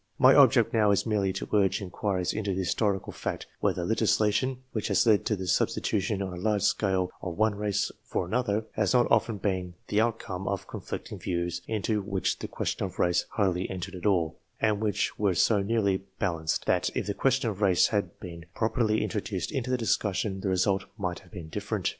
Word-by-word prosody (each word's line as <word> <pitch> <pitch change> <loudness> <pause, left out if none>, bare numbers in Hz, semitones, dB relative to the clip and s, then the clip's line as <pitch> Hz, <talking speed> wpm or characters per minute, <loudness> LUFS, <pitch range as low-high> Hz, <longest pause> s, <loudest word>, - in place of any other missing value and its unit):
My 130 +1 +7
object 130 -5 +5
now 110 -2 +4
is 100 - +2
merely 105 -4 +1
to 95 - -4
urge 100 -2 +3
inquiries 95 -1 -2
into 105 -2 -1
the - - -3
historical 95 +1 0
fact - - -4
whether 90 - 0
legislation, 110 +4 +2
which 110 - -2
has 100 +1 +3
led 110 -3 +4
to 110 - +1
the 95 -1 -5
substitution 100 +2 0
on 95 -2 -5
a 90 - -7
large 105 -2 +1
scale 95 -3 +1
of 90 -3 -5
one 110 0 +3
race 100 0 -1
for - - -2
another, 110 +1 0
has 105 -1 +1
not 120 - +5
often 110 -3 +3
been 95 -3 -2
the 105 - +3
outcome 110 -5 -2
of 100 -1 -2
conflicting - - -7
views 85 -1 -2
into 110 -1 0
which 95 -1 -1
the - - -4
question - - -3
of - - -5
race 90 0 +2
hardly 95 -3 0
entered 95 0 -5
at 90 +2 -3
all, 85 -6 +1 0.2
and 110 -2 +1
which 105 -2 -1
were 100 -3 +2
so 105 +4 +3
nearly 100 -2 +1 0.2
balanced 85 -5 -1
that - - +2
if - - -1
the 100 - -2
question 130 0 +1
of 100 0 -9
race 95 -4 +4
had 100 -5 -2
been 85 -2 -9
properly 110 -2 +1
introduced 100 -3 -3
into 130 -4 -2
the 130 - +2
discussion 105 -3 0
the 95 - -2
result 95 +1 +1
might 90 -4 -3
have - - -20
been 90 -7 -8
different. 80 - -3
100 Hz, 200 wpm, -28 LUFS, 95-110 Hz, 0.2 s, My